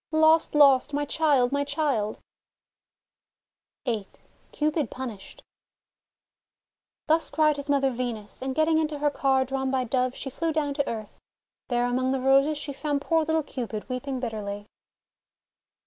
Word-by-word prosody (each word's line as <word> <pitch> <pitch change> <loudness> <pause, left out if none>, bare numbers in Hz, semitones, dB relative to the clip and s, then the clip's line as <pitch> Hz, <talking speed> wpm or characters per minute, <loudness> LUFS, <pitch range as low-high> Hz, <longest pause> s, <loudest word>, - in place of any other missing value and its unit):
"Lost! 315 0 +4
Lost! 280 -1 +5
My 290 0 0
child! 285 -5 +2
My 285 0 +1
child!" 280 -8 -1 1.7
vm 220 -4 -1 0.5
CUPID 305 0 0
PUNISHED 235 -7 -8 1.6
THUS 320 +1 +2
cried 305 -1 +3
his 285 0 -7
mother 275 -1 +2
Venus, 235 -4 -5
and 265 0 -3
getting 315 0 +3
into 310 -1 -1
her 295 0 +1
car 265 -2 +2
drawn 265 0 -2
by 260 -1 +1
Doves, 250 +1 -1
she 270 - -5
flew 330 +4 -1
down 300 -2 -1
to 285 0 -1
earth. 215 -2 -7 0.5
There 245 -1 +1
among 255 +2 0
the 270 - 0
Roses 275 +3 +3
she 285 -1 -5
found 290 0 -2
poor 325 +2 +2
little 320 0 0
Cupid, 230 -6 -5
weeping 255 +1 -3
bitterly. 205 -4 -5
275 Hz, 145 wpm, -26 LUFS, 250-300 Hz, 1.7 s, Lost